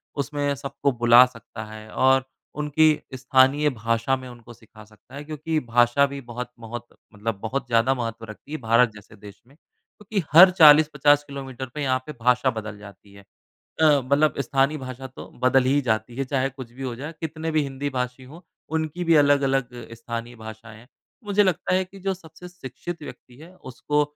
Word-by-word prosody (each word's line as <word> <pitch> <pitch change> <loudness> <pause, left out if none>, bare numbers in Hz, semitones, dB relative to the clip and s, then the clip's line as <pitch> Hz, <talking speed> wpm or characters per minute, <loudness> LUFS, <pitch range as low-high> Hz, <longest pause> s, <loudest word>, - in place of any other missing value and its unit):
उसमें 145 0 -2
सबको 140 0 -2
बुला 120 +1 +6
सकता 115 -2 -10
है 110 0 -11
और 130 0 +3 0.4
उनकी 150 +2 +3 0.3
स्थानीय 130 +3 +3
भाषा 115 +1 -1
में 130 - -10
उनको 120 -1 -13
सिखा 110 -1 -17
सकता 110 +5 -18
है। 145 - -7
क्योंकि 155 +1 -3
भाषा 120 +4 +3
भी 140 0 -7
बहुत, 120 +1 -7
बहुत 120 +1 -7 0.3
मतलब 105 0 -4
बहुत 125 +3 -3
ज़्यादा 120 +3 +3
महत्व 115 -2 -5
रखती 110 +6 -13
है, 155 - -3
भारत 115 +1 +3
जैसे 105 +1 -15
देश 100 -1 -14
में। 140 - -22
क्योंकि 200 +3 -7
हर 185 +3 +9
40-50 150 -3 +6
किलोमीटर 135 -2 -7
पे 150 - -4
यहाँ 130 -2 +1
पे 150 - -7
भाषा 125 +2 +3
बदल 110 -2 -7
जाती 100 -1 -15
है। 100 - -14 0.6
अ, - - +5 0.2
मतलब 140 +3 +1
स्थानीय 140 +2 +1
भाषा 130 0 -8
तो 130 - -11 0.2
बदल 130 0 +4
ही 140 +3 +2
जाती 115 -1 -2
है, 135 - -1
चाहे 135 0 -1
कुछ 130 -3 -11
भी 135 +2 -10
हो 125 -2 -4
जाए 150 +5 -7
कितने 160 0 -4
भी 155 -1 +1
हिंदी 140 +1 -4
भाषी 125 0 -4
हो, 165 +7 -14 0.2
उनकी 160 +2 -3
भी 165 - +4
अलग-अलग 135 -3 +2 0.2
स्थानीय 115 +1 -7
भाषाएँ 110 0 -11
हैं। 120 - -18 0.4
मुझे 205 0 +3
लगता 185 -1 0
है 185 0 +1
कि 195 +2 -15
जो 195 0 -1
सबसे 180 0 -13
शिक्षित 170 +1 -8
व्यक्ति 125 -3 -12
है 170 +5 -14
उसको 145 0 -2
130 Hz, 185 wpm, -24 LUFS, 120-150 Hz, 0.6 s, हर